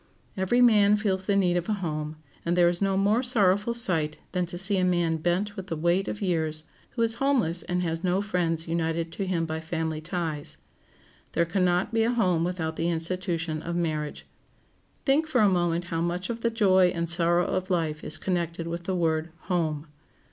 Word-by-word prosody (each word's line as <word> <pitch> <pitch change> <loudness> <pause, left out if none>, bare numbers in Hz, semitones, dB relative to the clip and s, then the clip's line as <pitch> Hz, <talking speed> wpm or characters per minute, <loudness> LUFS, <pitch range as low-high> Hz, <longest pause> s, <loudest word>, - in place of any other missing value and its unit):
Every 190 +6 +2
man 210 -3 +5
feels 190 -3 -1
the 200 - +2
need 180 -3 +2
of 175 +4 -3
a - - +2
home, 155 -5 -3 0.3
and 170 +1 0
there 175 -1 +6
is 175 +1 0
no 195 -1 +1
more 205 +4 +3
sorrowful 215 -3 +2
sight 165 -10 0
than 180 -1 -1
to 175 - -5
see 195 +2 +3
a - - +1
man 175 -3 +1
bent 180 +6 -1
with 190 -2 -7
the 165 - -3
weight 175 +5 +1
of 205 - -4
years, 160 -4 -1 0.3
who 230 - +1
is 225 0 +2
homeless 240 - +2
and 180 0 -2
has 165 0 -3
no 185 +1 +1
friends 170 -5 -1
united 165 0 -1
to 195 +3 -4
him 170 -3 0
by 160 0 -3
family 160 -1 -3
ties. 160 -3 -4 0.8
There 170 - +2
can 180 +3 0
not 180 +5 +1
be 225 - +2
a 225 - +2
home 185 -9 +2
without 170 -3 -3
the 165 +1 0
institution 165 -1 -1
of 170 +1 -4
marriage. 155 -3 -2 0.8
Think 295 +3 +3
for 270 -5 +1
a 210 - +6
moment 175 -2 +1
how 165 - 0
much 175 +4 -2
of 230 0 -6
the 230 - +2
joy 190 -5 +4
and 170 -1 -2
sorrow 175 +1 +3
of 185 +1 -2
life 160 -4 -1
is 155 - -1
connected 170 -2 -2
with 170 +1 -5
the 190 - -1
word 160 -2 0
home. 160 -5 -1
175 Hz, 205 wpm, -26 LUFS, 165-195 Hz, 0.8 s, there